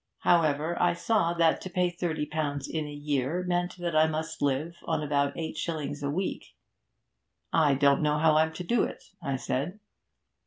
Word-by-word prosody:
However, 160 -1 +2
I - - +3
saw 170 -3 +1
that 165 -1 +3
to 185 - -6
pay 180 0 +1
thirty 170 -3 -2
pounds 145 -2 -2
in 155 -2 -3
a - - -7
year 145 +3 -1
meant 175 0 -1
that 175 -2 -3
I 155 0 +5
must 160 +1 -4
live 145 +5 0
on 160 -2 -1
about 140 -1 0
eight 160 -1 -4
shillings 155 -3 -3
a 140 - -1
week. 185 +6 -3 1.0
"I 150 -4 +4
don't 140 0 +4
know 150 0 +2
how 155 0 +4
I'm 160 +1 +3
to 180 - -5
do 235 +7 +2
it," - - -5 0.2
I 140 -2 -2
said. 140 +10 -3
155 Hz, 185 wpm, -28 LUFS, 145-170 Hz, 1.0 s, I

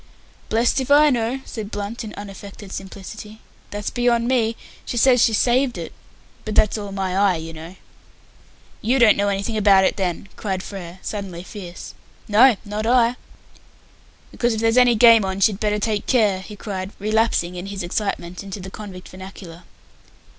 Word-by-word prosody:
"Blest 235 +4 +2
if 260 - -5
I 295 +1 +6
know!" 245 +2 -1
said 220 -4 -6
Blunt, 205 +3 -5
in 215 - -7
unaffected 200 0 -10
simplicity. 210 +3 -8 0.3
"That's 205 0 -4
beyond 240 -1 +1
me. 230 -3 +1 0.3
She 240 - -5
says 245 0 +5
she - - +4
saved 245 +3 +2
it. - - -7 0.5
But 215 -1 -4
that's 210 - +4
all 205 -2 -5
my 190 -2 -2
eye, 195 -1 +3
you 165 0 -6
know." 165 +3 -10 1.1
"You 245 +5 +2
don't 230 -5 +6
know 205 - 0
anything 200 +3 -1
about 200 -2 +5
it, - - +1
then?" 185 0 -2
cried 190 -3 -3
Frere, 180 -3 -8
suddenly 190 -5 -5
fierce. 185 -3 -9 0.3
"No, 230 +4 +6
not 210 +2 -3
I." 240 0 +4 1.2
"Because, 240 -2 0
if 220 - -3
there's 225 0 +2
any 245 -1 +5
game 230 -1 +7
on, 190 0 -3
she'd 195 0 +2
better 210 -1 0
take 210 0 -2
care," 210 -7 +3
he 210 +2 -10
cried, 190 -2 -5
relapsing, 215 -4 +1
in 180 +1 -6
his 195 -2 -5
excitement, 180 -1 -3
into 195 0 -7
the 190 0 -8
convict 190 -4 -9
vernacular. 185 -2 -11
210 Hz, 170 wpm, -21 LUFS, 190-230 Hz, 1.2 s, game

